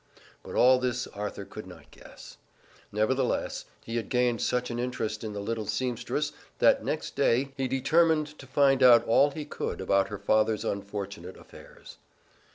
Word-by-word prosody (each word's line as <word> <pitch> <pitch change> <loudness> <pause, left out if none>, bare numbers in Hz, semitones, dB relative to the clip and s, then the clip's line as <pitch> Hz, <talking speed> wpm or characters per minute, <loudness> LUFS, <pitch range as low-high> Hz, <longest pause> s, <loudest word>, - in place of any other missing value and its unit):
But - - -9
all 130 +1 +6
this 125 -1 -1
Arthur 105 +1 -6
could - - -10
not - - -14
guess. - - -14 0.5
Nevertheless, 125 +5 -1 0.2
he 115 +1 -3
had 115 - -4
gained 125 -2 +1
such 125 0 -1
an 120 - -3
interest 110 -3 -3
in 110 -1 -5
the 100 - -5
little 110 +1 -3
seamstress 125 +5 -2 0.3
that - - +4
next - - -3
day 135 +3 +1
he 135 -2 -1
determined 155 +4 +2
to 135 - -11
find 135 0 +3
out 120 -2 +7
all 140 +5 +4
he 150 +1 -6
could 150 - -5
about 95 +1 +2
her 105 - -6
father's 110 +2 +1
unfortunate 100 -3 -5
affairs. - - -14
120 Hz, 165 wpm, -28 LUFS, 105-130 Hz, 0.5 s, out